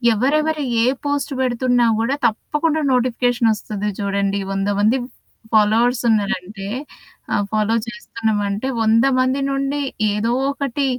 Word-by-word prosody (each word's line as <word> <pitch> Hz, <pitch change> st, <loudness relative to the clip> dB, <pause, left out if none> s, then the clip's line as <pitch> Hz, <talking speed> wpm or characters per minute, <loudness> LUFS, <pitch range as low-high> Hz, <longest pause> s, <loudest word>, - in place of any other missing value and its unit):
ఎవరెవరు 300 Hz, +4 st, +1 dB, 0.2 s
ఏ -, -, +3 dB, 0.2 s
పోస్ట్ 285 Hz, 0 st, -1 dB
బెడుతున్నా 245 Hz, -1 st, +2 dB
గూడా 265 Hz, +5 st, 0 dB
తప్పకుండా 300 Hz, +7 st, -1 dB
నోటిఫికేషన్ 245 Hz, -2 st, +2 dB
ఒస్తది 210 Hz, 0 st, -4 dB
చూడండి. 200 Hz, 0 st, 0 dB
100 195 Hz, +1 st, -1 dB
మంది 230 Hz, +5 st, +3 dB, 0.5 s
ఫాలోవర్స్ 225 Hz, +3 st, +3 dB
ఉన్నారంటే, 200 Hz, -2 st, -1 dB, 0.7 s
ఆహ్, 205 Hz, -, +2 dB
ఫాలో 215 Hz, +1 st, +1 dB
చేస్తున్నామంటే, 220 Hz, -1 st, -2 dB
100 225 Hz, +3 st, +4 dB
మంది 260 Hz, +2 st, +1 dB
నుండి, 275 Hz, +1 st, -1 dB, 0.3 s
ఏదో 220 Hz, +3 st, 0 dB, 0.2 s
ఒకటి 280 Hz, 0 st, -2 dB
235 Hz, 115 wpm, -20 LUFS, 210-270 Hz, 0.7 s, 100